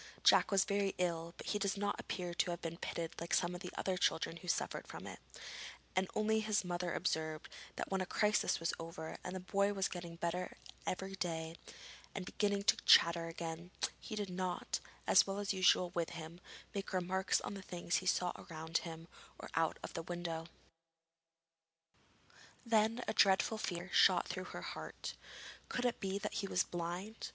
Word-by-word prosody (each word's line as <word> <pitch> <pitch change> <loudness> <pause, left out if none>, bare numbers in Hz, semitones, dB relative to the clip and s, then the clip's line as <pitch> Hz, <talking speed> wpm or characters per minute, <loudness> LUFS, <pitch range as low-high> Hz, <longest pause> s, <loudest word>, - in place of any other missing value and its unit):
Jack - - +7
was 195 -1 +4
very 200 -1 +1
ill, 170 -1 -1
but - - -8
he 210 - 0
does 200 0 0
not 205 0 0
appear 175 -2 -3
to 175 - +1
have 175 -1 -2
been 165 -1 -4
pitted 165 -1 -3
like 170 - +1
some 175 0 +2
of 180 - -6
the 180 - -4
other 190 -1 0
children 165 -1 +1
who 180 - -11
suffered - - -1
from - - -8
it, - - -7 0.8
and 185 0 +2
only 220 +1 +3
his 215 -2 +1
mother 175 0 -1
observed 155 -2 -1 0.3
that - - -4
when 195 - +2
the 185 - -1
crisis 210 +1 +2
was 165 0 0
over 165 -1 -6
and 180 - -4
the - - -2
boy 200 +2 +2
was 195 -1 +1
getting 175 -2 -6
better 170 +2 -2 0.3
every 190 +1 -2
day, 165 -3 -2 0.6
and 190 -2 -3
beginning 205 +1 +1
to - - +5
chatter 170 0 +6
again, 165 +1 -5 0.3
he 220 - -6
did 205 -3 -2
not, 180 -1 -1 0.3
as - - +7
was 200 +1 -1
usual 185 -1 +4
with 170 -2 0
him, 170 0 -7 0.3
make 200 0 -4
remarks 185 +1 +2
on - - -4
the 195 - -6
things 175 -2 -1
he 185 - -3
saw 180 -1 +3
around 160 0 -2
him 165 -1 -7 0.3
or - - -8
out 165 -1 +2
of - - -6
the 165 - -2
window. 165 -1 -4 2.2
Then 225 +1 +3
a - - +1
dreadful 195 +3 +4
fear 180 -2 -3
shot - - +6
through - - -3
her - - -7
heart. - - -5 0.6
Could 250 - -1
it 245 - +1
be 195 -1 -1
that 200 - -3
he 200 - -1
was 185 - +3
blind? 175 +5 -4
180 Hz, 185 wpm, -36 LUFS, 170-195 Hz, 2.2 s, Jack